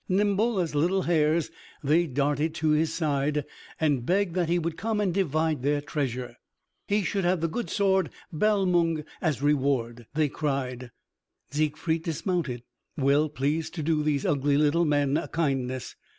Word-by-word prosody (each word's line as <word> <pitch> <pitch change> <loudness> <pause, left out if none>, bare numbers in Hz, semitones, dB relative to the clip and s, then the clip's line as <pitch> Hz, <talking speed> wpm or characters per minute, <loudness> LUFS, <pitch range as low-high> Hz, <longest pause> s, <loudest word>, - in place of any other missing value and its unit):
Nimble 205 +3 +2
as 170 -4 -1
little 175 +6 +2
hares 160 -1 +2 0.3
they 160 +4 +3
darted 145 +3 0
to 160 -2 0
his 155 +1 +2
side, 150 -2 0 0.3
and 145 -6 +1
begged 185 +4 +1
that 175 -2 0
he 175 - +3
would 170 -1 -2
come 220 +3 -2
and 195 -4 +1
divide 160 -5 0
their 145 +2 +1
treasure. 125 -4 -3 0.5
He 205 0 +1
should 195 +2 -1
have 175 0 +2
the 165 - 0
good 235 +9 -4
sword 190 -4 +2 0.2
Balmung 175 -4 +2 0.2
as 150 -5 -1
reward, 130 -5 0
they 155 -1 +3
cried. 130 -4 -3 0.6
Siegfried 155 +2 0
dismounted, 160 - -2 0.3
well 145 +2 +3
pleased 150 +4 -2
to 160 - -3
do 155 0 +1
these 150 -2 0
ugly 145 0 +2
little 155 +3 +3
men 145 -1 +2
a 165 - -3
kindness. 130 -5 -2
155 Hz, 155 wpm, -27 LUFS, 140-175 Hz, 0.6 s, they